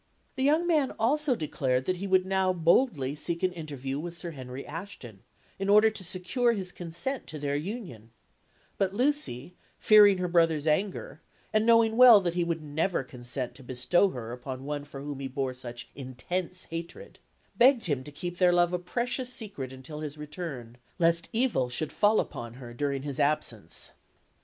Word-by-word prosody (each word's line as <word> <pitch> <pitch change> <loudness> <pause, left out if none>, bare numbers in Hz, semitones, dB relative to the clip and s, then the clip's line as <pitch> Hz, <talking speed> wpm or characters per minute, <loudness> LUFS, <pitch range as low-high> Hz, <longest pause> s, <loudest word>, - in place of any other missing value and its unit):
The - - -3
young 305 +5 +3
man 310 -6 +2
also 275 +4 +2
declared 130 - -1
that 185 - 0
he 200 +3 -4
would 185 -1 +3
now 190 -1 +2
boldly 165 - +2
seek 170 +4 -2
an 185 - +3
interview 145 -5 -5
with 170 +2 -6
Sir 170 -1 -5
Henry 130 -2 -8
Ashton, 145 - -9 0.4
in 195 +1 -1
order 210 +2 +6
to 215 -3 -5
secure 190 +7 0
his 190 -4 -4
consent 175 +12 -4
to 155 - -7
their 145 -1 -2
union; 150 - -6 0.7
but 195 0 0
Lucy, 245 - 0 0.2
fearing 205 -2 +7
her 180 0 -1
brother's 165 -3 +2
anger, 195 - -1 0.3
and 215 +1 +2
knowing 230 -1 +5
well 245 -4 +10
that 175 -3 -1
he 175 0 +1
would 165 -2 -2
never 155 +2 -1
consent 125 0 -4
to - - -14
bestow 130 +10 +2
her 120 -8 -6
upon 130 +2 -7
one 145 0 -4
for 140 -1 -9
whom 145 -1 -6
he 135 - -3
bore 130 -1 -2
such 120 -2 -8
intense 175 +8 -4
hatred, 170 - -7 0.4
begged 250 0 +5
him 145 -6 0
to 150 - -9
keep 175 +4 -6
their 180 -1 +5
love 175 0 +3
a 180 - 0
precious 245 +7 -2
secret 195 - -6
until 130 +4 -9
his 155 -1 -6
return, 145 -6 -7 0.2
lest 170 -1 +2
evil 225 - +1
should 145 +5 -1
fall 210 +1 +4
upon 120 0 -5
her 125 -2 -10
during 140 +1 -2
his 145 -2 -4
absence. 150 +1 -1
170 Hz, 180 wpm, -28 LUFS, 135-200 Hz, 0.7 s, well